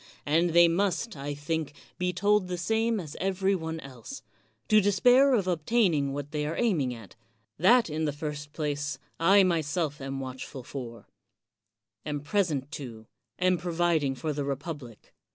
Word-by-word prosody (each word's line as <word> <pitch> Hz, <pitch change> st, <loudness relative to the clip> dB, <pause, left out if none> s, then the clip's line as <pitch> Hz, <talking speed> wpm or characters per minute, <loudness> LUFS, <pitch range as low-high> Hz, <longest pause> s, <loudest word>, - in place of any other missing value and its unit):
And 165 Hz, +4 st, +3 dB
they 170 Hz, 0 st, +7 dB
must, 195 Hz, +5 st, 0 dB
I 145 Hz, +1 st, -5 dB
think, 150 Hz, 0 st, -3 dB, 0.2 s
be 180 Hz, 0 st, +1 dB
told 200 Hz, +2 st, +2 dB
the 180 Hz, 0 st, -3 dB
same 220 Hz, +5 st, +1 dB
as 155 Hz, -5 st, -7 dB
every 195 Hz, +1 st, +1 dB
one 160 Hz, -3 st, -3 dB
else 130 Hz, -4 st, -10 dB, 0.2 s
— 110 Hz, +2 st, -42 dB
^to 215 Hz, 0 st, +6 dB
despair 245 Hz, +7 st, +5 dB
of 200 Hz, -5 st, +1 dB
obtaining 170 Hz, -4 st, +2 dB
what 145 Hz, +1 st, -5 dB
they 150 Hz, -1 st, -2 dB
are 160 Hz, -, -3 dB
aiming 170 Hz, -, +1 dB
at; 115 Hz, -5 st, -10 dB, 0.4 s
that 235 Hz, +8 st, +5 dB
in 155 Hz, 0 st, -2 dB
the 150 Hz, -, 0 dB
first 145 Hz, 0 st, -6 dB
place, 150 Hz, -1 st, -3 dB, 0.2 s
I 195 Hz, +4 st, +6 dB
myself 160 Hz, -3 st, 0 dB
am 135 Hz, 0 st, -4 dB
watchful 130 Hz, 0 st, -7 dB
for, 120 Hz, -3 st, -8 dB, 1.0 s
am 145 Hz, -1 st, -3 dB
present 150 Hz, -5 st, -1 dB
to, 115 Hz, -4 st, -9 dB, 0.3 s
am 185 Hz, -1 st, +2 dB
providing 170 Hz, -5 st, +1 dB
for 155 Hz, +3 st, -3 dB
the 145 Hz, 0 st, -2 dB
republic. 140 Hz, -4 st, -6 dB
160 Hz, 160 wpm, -28 LUFS, 140-185 Hz, 1.0 s, they